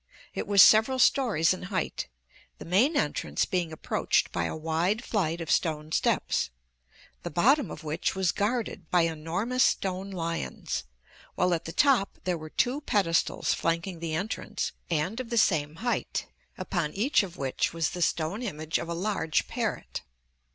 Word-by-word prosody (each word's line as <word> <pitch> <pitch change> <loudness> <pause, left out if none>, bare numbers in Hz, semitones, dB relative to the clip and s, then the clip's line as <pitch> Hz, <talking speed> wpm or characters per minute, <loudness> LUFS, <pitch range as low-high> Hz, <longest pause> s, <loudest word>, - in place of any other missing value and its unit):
It - - -4
was 200 -2 +8
several 220 +5 +6
stories 225 - +3
in 185 - -7
height, 185 -2 -2 0.5
the - - -9
main 235 - +3
entrance - - 0
being 175 -4 -1
approached 155 - 0
by 85 -1 -1
a - - -3
wide 165 +8 0
flight 170 -8 -1
of 165 -2 -3
stone 155 -2 0
steps, 60 - +1 0.7
the 175 - -5
bottom 255 - +3
of 155 - -8
which 155 +4 -1
was 190 -2 +2
guarded 215 -5 -2
by 180 - +4
enormous 165 +10 -1
stone 190 -3 +1
lions, 165 - -3 0.5
while 180 0 +2
at 165 - -2
the 165 - -4
top 260 - +3
there 180 -1 0
were 155 -1 -8
two 255 - 0
pedestals 190 - +1
flanking 165 +1 -1
the 160 -1 -3
entrance 195 +8 -3 0.2
and 170 +8 -1
of 255 -3 -5
the 235 - -1
same 155 -7 +2
height, 240 - -1 0.3
upon 160 -4 -2
each 235 +9 +3
of 185 -3 -7
which 135 -2 -1
was 165 -2 -1
the 180 - -5
stone 165 +5 0
image 160 -8 -2
of 170 - -5
a 170 - -2
large 175 -4 0
parrot. - - -3
175 Hz, 165 wpm, -28 LUFS, 160-215 Hz, 0.7 s, was